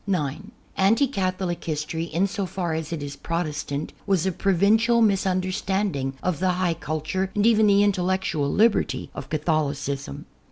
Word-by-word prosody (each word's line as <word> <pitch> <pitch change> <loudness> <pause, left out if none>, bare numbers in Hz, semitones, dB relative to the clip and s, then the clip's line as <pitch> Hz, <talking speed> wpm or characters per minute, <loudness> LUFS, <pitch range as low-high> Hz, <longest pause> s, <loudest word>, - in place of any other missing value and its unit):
(9) 180 +1 -2 0.3
Anti 220 +9 +4
Catholic 185 -7 -2
history, 160 +1 -2
in 170 +3 0
so 200 -1 -3
far 175 -3 -3
as 160 0 -4
it 160 -4 -3
is 145 0 -6
Protestant. 155 -3 -3
was 190 -3 +2
a 190 - +1
provincial 205 +6 +3
misunderstanding 190 - 0
of 180 -5 -1
the 185 0 +2
high 180 -1 +1
culture 155 +4 -3
and 205 0 +2
even 220 -2 +5
the 200 0 +5
intellectual 185 -7 0
liberty 220 +1 +2
of - - -8
Catholicism. 145 - -2
185 Hz, 150 wpm, -24 LUFS, 155-195 Hz, 0.3 s, even